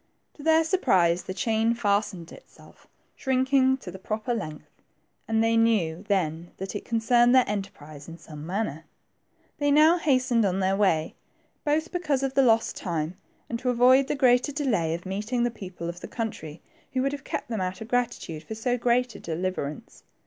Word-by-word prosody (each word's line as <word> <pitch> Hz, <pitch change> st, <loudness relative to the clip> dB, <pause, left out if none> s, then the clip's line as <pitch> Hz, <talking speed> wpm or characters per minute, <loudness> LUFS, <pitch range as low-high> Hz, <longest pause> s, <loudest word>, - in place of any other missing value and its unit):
To -, -, -14 dB
their 320 Hz, +1 st, +4 dB
surprise, 185 Hz, -, +2 dB
the 185 Hz, -, -6 dB
chain 225 Hz, +2 st, +1 dB
fastened 205 Hz, -6 st, -1 dB
itself, -, -, -17 dB, 0.3 s
shrinking 265 Hz, 0 st, +2 dB
to 200 Hz, -8 st, -9 dB
the 190 Hz, -, -10 dB
proper 215 Hz, +5 st, -3 dB
length, 155 Hz, -9 st, -7 dB, 0.5 s
and 225 Hz, 0 st, +2 dB
they 225 Hz, 0 st, +2 dB
knew 205 Hz, -7 st, +2 dB
then 170 Hz, -4 st, -1 dB
that 190 Hz, +2 st, -6 dB
it 205 Hz, -, -4 dB
concerned 240 Hz, +2 st, +3 dB
their 255 Hz, -2 st, +5 dB
enterprise 155 Hz, -8 st, -6 dB
in 165 Hz, 0 st, -9 dB
some 150 Hz, -3 st, -11 dB
manner. 170 Hz, -3 st, -3 dB, 0.7 s
They 290 Hz, 0 st, +1 dB
now 310 Hz, +4 st, +5 dB
hastened 255 Hz, -6 st, +2 dB
on 190 Hz, -1 st, 0 dB
their 190 Hz, 0 st, +1 dB
way, 175 Hz, -6 st, +1 dB, 0.5 s
both 310 Hz, +3 st, 0 dB
because 300 Hz, -7 st, -1 dB
of 270 Hz, -1 st, -1 dB
the 275 Hz, -, +4 dB
lost 230 Hz, -3 st, +3 dB
time, 165 Hz, -2 st, -3 dB, 0.3 s
and 235 Hz, -, -4 dB
to 250 Hz, -, -1 dB
avoid 255 Hz, +2 st, +5 dB
the -, -, -1 dB
greater 255 Hz, 0 st, +3 dB
delay 220 Hz, -, 0 dB
of 170 Hz, -, -9 dB
meet 200 Hz, +4 st, -4 dB
ing 245 Hz, -1 st, +1 dB
the 240 Hz, -, +1 dB
people 185 Hz, -6 st, -8 dB
of 170 Hz, +1 st, -6 dB
the -, -, -8 dB
country, 190 Hz, -9 st, -6 dB, 0.3 s
who 260 Hz, -1 st, +1 dB
would 275 Hz, -, +1 dB
have 285 Hz, -1 st, -6 dB
kept -, -, -5 dB
them 220 Hz, -4 st, -2 dB
out 185 Hz, 0 st, -3 dB
of 220 Hz, -, -8 dB
gratitude 240 Hz, -10 st, -2 dB
for 220 Hz, +7 st, -7 dB
so 245 Hz, +3 st, -1 dB
great 245 Hz, 0 st, +1 dB
a -, -, -10 dB
deliverance. 165 Hz, -3 st, -4 dB
225 Hz, 185 wpm, -26 LUFS, 180-255 Hz, 0.7 s, their